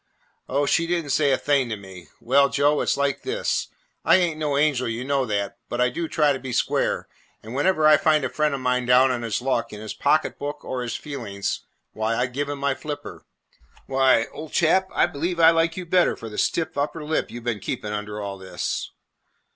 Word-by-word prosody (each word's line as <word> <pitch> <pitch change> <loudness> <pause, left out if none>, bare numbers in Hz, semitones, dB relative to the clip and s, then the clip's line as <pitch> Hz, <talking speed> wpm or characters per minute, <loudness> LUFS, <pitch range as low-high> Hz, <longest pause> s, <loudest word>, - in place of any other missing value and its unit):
"Oh, 140 +2 +1
she 165 +3 +2
did 170 -2 0
n't 140 - -4
say 145 0 +3
a 130 - +3
thing 140 -4 +1
to 110 - -2
me." 95 -4 -12
"Well, 140 +3 +3
Joe, 145 +2 +2
it - - -2
's - - +3
just - - -4
like 140 0 0
this. 435 +5 -1 0.4
I - - +6
ain't 170 -4 +1
an 145 -2 0
angel, 140 -4 +2
you 115 +2 -3
know 135 -1 0
that, 100 +1 -2
but 120 - -3
I 125 0 +4
do 165 +6 -3
try 150 -2 +2
to 135 - -4
be 130 0 -6
square, - - 0 0.4
and 110 +2 -8
whenever 155 +3 +2
I 155 -1 +8
find 155 -2 +2
a - - +1
friend 150 -2 0
of 135 - -6
mine 125 -1 0
down 130 +1 +5
on 125 -2 -2
his 115 0 -2
luck, 120 -3 0
in 105 - -8
his 110 -1 -6
pocket 155 +2 +1
book 145 +1 -5
or 130 -1 -3
his 120 -2 -3
feelings, 110 -10 -4 0.3
why, 110 +1 -1
I 125 - +1
give 140 +4 -3
him 145 - -3
my 140 0 0
flipper. 150 +1 -7 0.6
Why, 135 -1 +3
old 155 0 -9
chap, 190 +3 +3
I - - +3
believe 170 +4 -3
I 165 0 +8
like 165 0 +1
you 180 - -4
better 180 +1 +3
for 115 - -8
the 105 - -5
stiff 160 -3 0
upper 150 +2 -2
lip 155 +1 -1
you 120 - -7
've - - -15
been 115 -3 -2
keeping 105 +2 -4
under 105 0 -4
all 100 -1 -5
this." 95 0 -4
140 Hz, 235 wpm, -24 LUFS, 120-155 Hz, 0.6 s, I